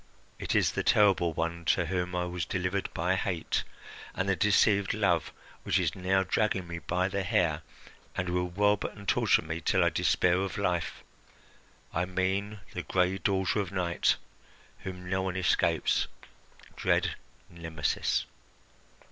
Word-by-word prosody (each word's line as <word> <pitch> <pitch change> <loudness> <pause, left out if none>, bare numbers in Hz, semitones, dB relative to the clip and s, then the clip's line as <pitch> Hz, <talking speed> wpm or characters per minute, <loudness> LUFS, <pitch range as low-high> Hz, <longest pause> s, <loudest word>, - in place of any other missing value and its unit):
It - - -2
is - - +3
the - - -1
terrible 95 -5 +4
one 85 +1 -3
to 90 +3 +2
whom 90 +1 -2
I 90 0 0
was 90 -1 -3
delivered 90 +2 -2
by 90 +3 0
hate 95 -3 -1 0.5
and 95 - -1
the 100 - +2
deceived 100 +1 +3
love 95 -7 +1 0.3
which - - +1
is - - +1
now 95 +1 +1
dragging 95 -1 0
me 85 0 -5
by 90 +2 0
the 100 +1 -2
hair, 80 -4 +1 0.6
and 90 - -1
will 90 0 0
rob 105 +3 +2
and 100 -1 -7
torture - - +3
me 80 +1 -4
till 95 -3 +2
I 85 - +4
despair 90 +1 +2
of 95 +2 -2
life. 90 -4 -1 0.9
I 85 +2 +1
mean 95 +3 -1
the - - -3
gray 95 +1 +1
daughter 95 +2 +1
of 95 -3 -2
Night, 90 -3 +1 0.6
whom 90 -1 -7
no 95 +1 0
one 95 -1 -2
escapes, 95 - +2 0.7
dread - - +1 0.3
Nemesis." 80 -3 -1
90 Hz, 150 wpm, -29 LUFS, 85-95 Hz, 0.9 s, terrible